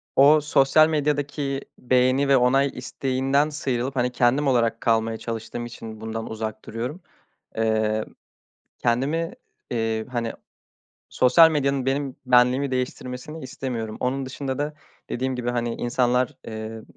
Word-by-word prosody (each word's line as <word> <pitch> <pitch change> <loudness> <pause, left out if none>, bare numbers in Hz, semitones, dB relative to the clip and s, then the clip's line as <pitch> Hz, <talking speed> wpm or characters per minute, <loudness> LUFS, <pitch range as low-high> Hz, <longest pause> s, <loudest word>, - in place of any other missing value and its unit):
o 150 +3 +7
sosyal 150 +1 +4
medyadaki 145 -2 -1 0.2
beğeni 130 +2 +3
ve 135 -1 +5
onay 135 +3 +3
isteğinden 135 +2 0
sıyrılıp, 135 -3 -2
hani, 125 -1 +1
kendim 125 +4 +2
olarak 115 -3 +2
kalmaya 115 -1 +1
çalıştığım 115 +1 -5
için 110 -2 -9
bundan 110 0 -5
uzak 110 -1 -5
duruyorum. 125 - -5 0.6
Eee, 110 -1 +1 0.7
kendimi, 145 +8 0 0.4
eee, 110 -2 -1
hani, 115 -2 -2 0.8
sosyal 160 +6 +6
medyanın 140 -3 0
benim 135 0 -1
benliğimi 125 +2 +4
değiştirmesini 130 +4 -4
istemiyorum. 115 -4 -5
Onun 135 +2 -1
dışında 130 0 -4
da 150 +1 -2 0.4
dediğim 130 +1 -2
gibi 125 -1 -2
hani 120 -1 -1
insanlar, 125 +1 +1
emm, 110 0 -7
125 Hz, 125 wpm, -24 LUFS, 115-140 Hz, 0.8 s, o